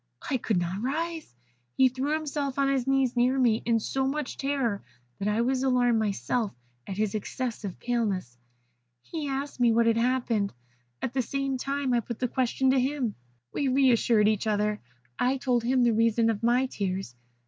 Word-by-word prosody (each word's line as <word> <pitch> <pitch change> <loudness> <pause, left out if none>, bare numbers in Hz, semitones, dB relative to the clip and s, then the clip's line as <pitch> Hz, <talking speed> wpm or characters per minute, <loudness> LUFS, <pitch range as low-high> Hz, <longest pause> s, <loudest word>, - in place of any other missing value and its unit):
I 265 - +3
could 225 -4 -1
not 175 +3 -2
rise. 320 - -3 0.4
He 265 - +6
threw 265 +4 -2
himself 290 -3 -2
on 275 0 +2
his 265 -2 0
knees 270 -2 +2
near 250 +2 +3
me, 235 -4 +3
in 230 -1 +3
so 265 +4 -1
much 295 0 -3
terror 270 -7 -1 0.4
that 200 - -2
I 210 +2 +1
was 255 +2 +1
alarmed 245 -3 +3
myself 210 - -1 0.3
at 195 - -5
his 215 -2 0
excessive 215 -2 -4
paleness. 205 - -2 0.7
He 315 -3 -5
asked 275 0 -4
me 240 -1 +5
what 230 +1 +3
had 230 0 +3
happened. 235 - 0 0.5
At 245 - -2
the 265 - +1
same 275 +2 -2
time 275 0 -1
I 240 - +4
put 235 0 -6
the 255 - -1
same 245 - -5
question 260 +1 +2
to 265 - +3
him. 260 -4 -1 0.4
We 280 - 0
re 265 0 +4
assured 225 -2 +3
each 215 0 +1
other. 210 0 +1 0.4
I 255 +2 +2
told 250 -3 0
him 250 +1 +2
the 235 -1 +4
reason 230 +1 +3
of 205 - -4
my 240 +3 +3
tears. 190 - -3
245 Hz, 190 wpm, -27 LUFS, 220-270 Hz, 0.7 s, He